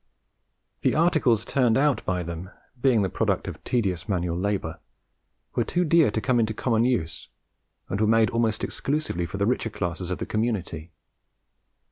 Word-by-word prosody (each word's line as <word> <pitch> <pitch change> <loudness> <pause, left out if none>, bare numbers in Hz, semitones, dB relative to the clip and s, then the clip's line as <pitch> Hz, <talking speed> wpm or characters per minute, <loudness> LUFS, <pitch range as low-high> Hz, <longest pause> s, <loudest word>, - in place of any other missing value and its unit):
The - - +2
articles 150 -9 +3
turned 125 -4 +2
out 140 -4 +2
by 90 -1 -1
them, 85 +2 -6 0.3
being 120 -6 +4
the - - +1
product - - 0
of - - -7
tedious 100 -6 -1
manual 90 -3 0
labour, 95 -3 -2 0.7
were - - +1
too 180 0 0
dear 165 -3 +5
to 105 - -1
come 120 +3 +1
into 110 -1 0
common 115 -1 +1
use, 80 - -1 0.6
and 100 - -2
were 110 - +3
made 115 +1 +4
almost 115 -2 0
exclusively 135 - -2
for 100 - -6
the 100 - +1
richer 115 0 0
classes 85 -3 -4
of 90 - -2
the - - -4
community. 95 -8 -2
110 Hz, 165 wpm, -25 LUFS, 90-125 Hz, 0.7 s, dear